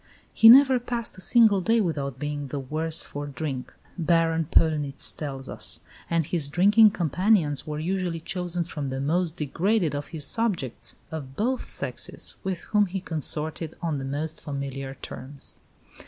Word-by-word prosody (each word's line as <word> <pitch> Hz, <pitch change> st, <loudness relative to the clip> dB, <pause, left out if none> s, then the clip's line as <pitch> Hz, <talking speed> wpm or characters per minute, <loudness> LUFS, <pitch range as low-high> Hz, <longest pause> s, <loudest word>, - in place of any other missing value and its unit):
"He 225 Hz, -, +8 dB
never 260 Hz, +1 st, +8 dB
passed 235 Hz, -1 st, -5 dB
a 185 Hz, -, -8 dB
single 215 Hz, 0 st, +5 dB
day 225 Hz, +5 st, +2 dB
without 145 Hz, -, -2 dB
being 145 Hz, 0 st, -4 dB
the 145 Hz, -, -5 dB
worse 155 Hz, +4 st, -1 dB
for 145 Hz, 0 st, -6 dB
drink," 140 Hz, -2 st, -5 dB, 0.3 s
Baron 165 Hz, -1 st, +2 dB
Pöllnitz 150 Hz, -3 st, +2 dB
tells 135 Hz, -3 st, -5 dB
us; -, -, -4 dB, 0.3 s
and 165 Hz, -2 st, +1 dB
his 150 Hz, -3 st, 0 dB
drinking 205 Hz, +7 st, +6 dB
companions 175 Hz, -4 st, +1 dB
were 150 Hz, -1 st, -3 dB
usually 175 Hz, +1 st, -2 dB
chosen 175 Hz, +1 st, -3 dB
from 150 Hz, -4 st, -5 dB
the 130 Hz, 0 st, -3 dB
most 165 Hz, +4 st, 0 dB
degraded 175 Hz, +3 st, 0 dB
of 145 Hz, 0 st, -4 dB
his 155 Hz, -4 st, -3 dB
subjects, 180 Hz, -, -1 dB, 0.2 s
of 140 Hz, -4 st, -7 dB
both 250 Hz, -, -1 dB
sexes, -, -, 0 dB
with 190 Hz, -2 st, -3 dB
whom 210 Hz, -1 st, +2 dB
he 190 Hz, +2 st, -3 dB
consorted 160 Hz, -2 st, -3 dB
on 160 Hz, -4 st, -2 dB
the -, -, -5 dB
most 150 Hz, +4 st, -4 dB
familiar 135 Hz, -2 st, -5 dB
terms. 135 Hz, +2 st, -7 dB
160 Hz, 155 wpm, -26 LUFS, 145-185 Hz, 0.3 s, He